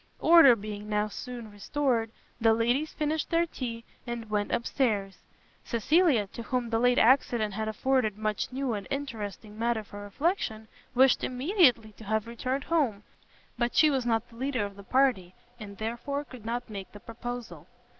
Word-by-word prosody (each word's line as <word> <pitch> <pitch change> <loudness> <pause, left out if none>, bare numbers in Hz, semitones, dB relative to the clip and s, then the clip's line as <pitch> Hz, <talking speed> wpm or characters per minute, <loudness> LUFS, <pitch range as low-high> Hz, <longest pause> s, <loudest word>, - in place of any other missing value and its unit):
Order 330 -7 +7
being 210 -1 -7
now 210 0 0
soon 240 -1 -8
restored, 230 +2 -1 0.3
the 225 -1 +4
ladies 245 +7 +1
finished 305 0 -2
their 335 0 +3
tea, 235 -7 -6 0.2
and 235 -2 -5
went 205 -1 0
up 235 - 0
stairs. 205 -7 -1 0.4
Cecilia, 265 - +3
to - - -6
whom 240 -1 -2
the 225 - +2
late 245 +1 +3
accident 235 -4 +3
had 220 +2 -3
afforded 220 -1 0
much 215 +1 -2
new 260 -1 -2
and 200 -3 -5
interesting 220 -6 -5
matter 230 -1 0
for 205 0 -10
reflection, 220 - -2 0.3
wished 260 0 +5
immediately 255 - +2
to - - -11
have 220 +1 0
returned 255 +4 -3
home, 260 -12 0 0.6
but 240 0 0
she 310 -1 +6
was 265 -2 0
not 225 -2 0
the 230 - -17
leader 255 -4 -1
of 200 -1 -8
the 200 - -11
party, 200 -6 +1 0.2
and 200 -2 -9
therefore 240 +6 -3
could 250 -6 -12
not 240 +1 -3
make 200 -4 -8
the 205 - -10
proposal. 230 -8 -7
235 Hz, 170 wpm, -28 LUFS, 215-265 Hz, 0.6 s, Order